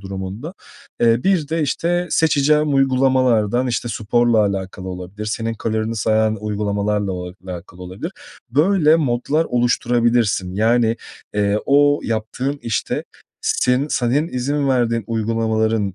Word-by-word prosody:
durumunda. 100 - -6 0.5
Eee, 115 0 +3
bir 180 -7 +2
de, 160 0 0
işte, 175 +5 0
seçeceğim 150 -1 +2
uygulamalardan, 130 -3 +2
işte, 120 -1 -2
sporla 115 +1 +1
alakalı 95 -1 -4
olabilir, 95 +3 -7
senin 115 +1 -2
kalorini 110 +1 -2
sayan 110 +1 +1
uygulamalarla 105 -1 -1
o 90 0 -5
alakalı 90 0 -9
olabilir. 95 - -6 0.4
Böyle 155 +3 +4
modlar 145 +2 0
oluşturabilirsin. 120 - +1
Yani, 115 +2 +2 0.4
eee, 105 0 +1
o 145 +1 +4
yaptığın 115 +5 -2
işte 115 - -2 0.4
se 125 +3 +1
senin 140 +5 +1
izin 140 +1 -1
verdiğin 115 -3 +1
uygulamaların, 110 -2 0
115 Hz, 115 wpm, -20 LUFS, 105-135 Hz, 0.5 s, Böyle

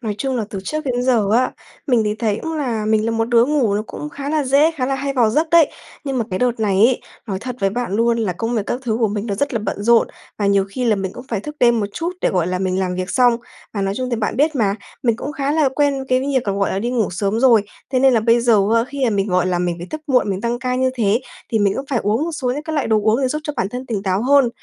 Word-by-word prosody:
Nói 215 -4 -3
chung 265 -2 -1
là 220 - -1
từ 195 - -4
trước 310 +6 -3
đến 245 -2 -1
giờ 240 -5 +2
á, 250 +3 +2 0.3
mình 245 -5 +3
thì 210 0 0
thấy 215 -2 -1
cũng 320 +5 -4
là 235 -7 -2
mình 215 0 +2
là - - +1
một 225 0 -1
đứa 235 -1 +5
ngủ 260 -7 +1
nó 210 - 0
cũng 300 - -7
khá 285 -1 -6
là 305 -1 0
dễ, 280 +5 +4
khá 275 -6 -3
là 270 - 0
hay 275 +1 -2
vào 235 -5 +3
giấc 310 +6 0
đấy, 335 -3 +5 0.3
nhưng 270 -2 -2
mà 230 - 0
cái 185 - -2
đợt 245 -2 0
này 200 -3 +1
ấy, 235 +5 +4 0.3
nói 195 -4 -3
thật 250 +3 -6
với 195 -1 +2
bạn 240 -1 -3
luôn 235 0 +2
là 215 -5 0
công 225 +7 -3
việc 220 - 0
các 245 - -2
thứ 225 -4 -1
của 225 - +3
mình 205 +1 -3
nó 205 - -2
rất 280 +8 -1
là - - +1
bận 205 -1 -4
rộn, 235 +1 +4 0.3
và 205 - 0
nhiều 200 -1 +3
khi 250 +6 -3
là 225 -3 +3
mình 190 -1 -3
cũng 245 - -10
phải 220 -4 -2
thức 300 +8 -8
đêm 235 -2 +4
một 205 - -1
chút 340 +2 -3
để, - - +2
gọi 180 -3 0
là, 180 0 -1
mình 185 0 -1
làm 180 -1 -1
việc 185 +1 -3
xong. 245 -2 +4 0.4
Và 200 - -2
nói 195 0 -1
chung 255 -1 -3
thì 235 - 0
bạn 220 0 -2
biết 300 +4 +2
mà, 200 -5 +1 0.3
mình 235 -3 +2
cũng 285 +5 -5
khá 280 0 -1
là 305 -3 +3
quen 275 0 0
cái 255 0 +3
việc, 265 -2 0
gọi 200 0 0
là, 190 - -1
đi 235 +4 -2
ngủ 230 -5 0
sớm 200 +4 -1
rồi, 240 -5 +5 0.3
thế 260 - +1
nên 265 0 +5
là 225 - +3
bây 230 +2 +3
giờ, 235 -2 +4 0.2
a, 230 0 +3
khi, 275 +2 -6
ờ, 250 - +3
mình, 200 -2 0
gọi 180 -1 +2
là, 180 -1 0
mình 175 -1 0
phải 175 - -7
thức 310 - -5
muộn, 255 -7 +2
mình 190 0 -2
tăng 235 +2 -1
ca 250 0 -2
như 260 0 +1
thế 225 -1 +1 0.3
thì 225 - +3
mình 200 -2 +2
cũng 270 - -4
phải 255 - +1
uống 215 +8 +1
một 335 - -4
số 260 -5 -2
những 285 +4 -3
cái 315 0 -5
loại 290 - 0
đồ 220 - +3
uống 220 +5 +2
để 260 - +2
giúp 300 +4 -2
cho 300 - -3
bản 190 - 0
thân 250 +4 -6
tỉnh 215 -5 -3
táo 190 +1 0
hơn. 275 0 +4
235 Hz, 315 wpm, -19 LUFS, 205-265 Hz, 0.4 s, đứa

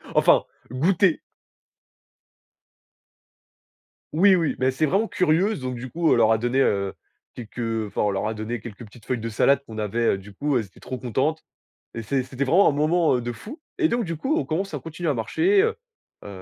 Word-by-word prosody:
Enfin, - - +5 0.3
goûter. 170 +6 +2 2.9
Oui 190 +5 +5
oui, 165 -4 0
mais 130 +1 +1
c'est 130 +4 0
vraiment 195 +9 +1
curieuses, 185 +2 +1
donc 130 0 -3
du 125 +2 -7
coup 165 -1 +1
on - - +4
leur 110 - +4
a 110 - +4
donné, 120 +4 +1
heu, 100 -5 +1 0.4
quelques, 120 0 -9
heu, 115 -2 -2
enfin - - -3
on 105 - +2
leur 95 +1 -2
a 110 - -1
donné 110 +2 -5
quelques 120 0 -9
petites 110 +1 -17
feuilles 125 - -1
de 115 - -4
salade 130 +5 +3
qu'on 110 - -9
avait, 110 +2 0
heu, - - -2
du 100 +1 -13
coup, 145 +6 0
elles 115 - 0
étaient 95 - -20
trop 130 - -6
contentes 130 +6 -1 0.5
et 115 - -5
c'est 130 +4 -1
c'était 130 +1 -6
vraiment 170 +9 +4
un - - +2
moment, 155 +3 +2
heu, - - -2
de 120 - -3
fou 225 - -9 0.2
et 340 - +3
donc 235 -4 0
du 165 -3 -4
coup, 265 - -1
on 330 - 0
commence 170 +2 -3
à 145 - -3
continuer 165 +3 -5
à 145 - +2
marcher, 355 - +2
heu 455 +1 0 0.5
heu, - - -8
130 Hz, 210 wpm, -24 LUFS, 115-170 Hz, 2.9 s, Enfin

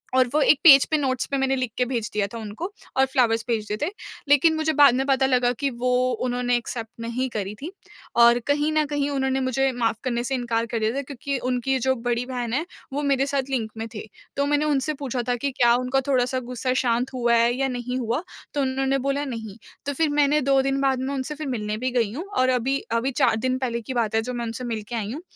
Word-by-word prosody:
और 255 -1 +4
वो 305 - +3
एक 290 - +5
पेज 275 -5 +9
पे 310 - +4
नोट्स 260 -4 0
पे 275 - +1
मैंने 270 0 +1
लिख 255 -3 -2
के 250 - +2
भेज 235 -4 -2
दिया 210 -1 +1
था 230 - -5
उनको 220 - -6 0.3
और 265 - +5
फ्लावर्स 235 -4 +1
भेज 225 -3 -1
दिए 210 - -1
थे। 310 - 0 0.4
लेकिन 305 +3 +5
मुझे 315 0 0
बाद 285 -3 +7
में 265 +1 0
पता 265 -1 +3
लगा 250 -2 +2
कि 280 - +1
वो 250 0 -2 0.4
उन्होंने 245 0 0
एक्सेप्ट 230 -1 -5
नहीं 235 +3 -2
करी 205 -3 -4
थी। 325 - -5 0.5
और 235 +1 +7
कहीं 295 +2 +1
न 310 -1 +2
कहीं 290 -1 -1
उन्होंने 265 -1 0
मुझे 265 +1 +1
माफ़ 230 -3 -1
करने 240 -2 -1
से 265 +2 -1
इंकार 235 -2 -1
कर 230 0 -3
दिया 220 0 +1
था 280 - -1
क्योंकि 280 0 -4
उनकी 255 +2 0
जो 260 +1 +1
बड़ी 240 0 -2
बहन 245 -2 -4
है, 300 +6 0 0.3
वो 290 - -1
मेरे 275 -1 +2
साथ 275 -1 -2
लिंक 225 -5 -1
में 225 +1 -4
थे। 215 - -6 0.3
तो 280 - +2
मैंने 295 +1 +1
उनसे 300 0 +1
पूछा 260 -4 -3
था 245 - +2
कि 275 +4 -2
क्या 240 -2 +4
उनका 255 +2 0
थोड़ा-सा 255 -1 +1
गुस्सा 255 +1 -1
शांत 245 +2 0
हुआ 240 -2 +1
है 235 +1 +3
या 270 +1 0
नहीं 250 0 -3
हुआ? 240 +7 -1 0.3
तो 290 - 0
उन्होंने 270 +1 0
बोला 280 +1 0
नहीं, 225 -6 -6 0.3
तो 285 - -1
फिर 315 +2 +1
मैंने 295 0 +3
2 270 0 +3
दिन 270 0 0
बाद 265 -2 +2
में 265 +2 -2
उनसे 275 +3 -3
फिर 305 0 -5
मिलने 215 -4 -3
भी 255 +3 -2
गई 230 -4 +1
हूँ 320 +9 -5
और 255 0 +3
अभी 255 +2 +1 0.2
अभी 265 +3 -1
4 - - +4
दिन 255 +3 0
पहले 235 -3 -2
की 260 +4 -6
बात 225 -3 0
है 225 - +3
जो 250 +3 -5
मैं 240 -1 -3
उनसे 230 +2 -5
मिलके 230 -1 -4
आई 215 -1 -3
हूँ। 300 - -6
255 Hz, 250 wpm, -24 LUFS, 235-275 Hz, 0.5 s, पेज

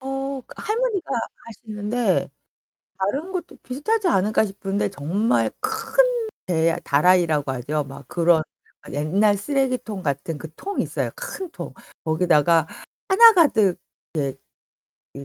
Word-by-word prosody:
어 270 0 -4
할머니가 430 - -1 0.4
하시는데 220 +1 -1 0.7
다른 275 - -2
것도 365 -2 -5
비슷하지 370 - 0
않을까 215 - +3
싶은데 195 0 -2
정말 195 - 0
큰 440 +3 -4 0.5
대 165 -1 +2
다라이라고 155 -2 +3
하죠. 145 +4 -2
막 140 +1 -11
그런 170 -2 +3 0.5
옛날 195 +8 +2
쓰레기통 255 -4 -1
같은 145 +2 -2
그 160 - -8
통 400 +1 -5
있어요, - - -1
큰 405 -7 -6
통. - - -8 0.3
거기다가 160 -1 +3 0.4
하나 450 +4 +9
가득 220 - +4 1.3
이제 140 0 -9
205 Hz, 245 characters per minute, -23 LUFS, -, 1.3 s, 하나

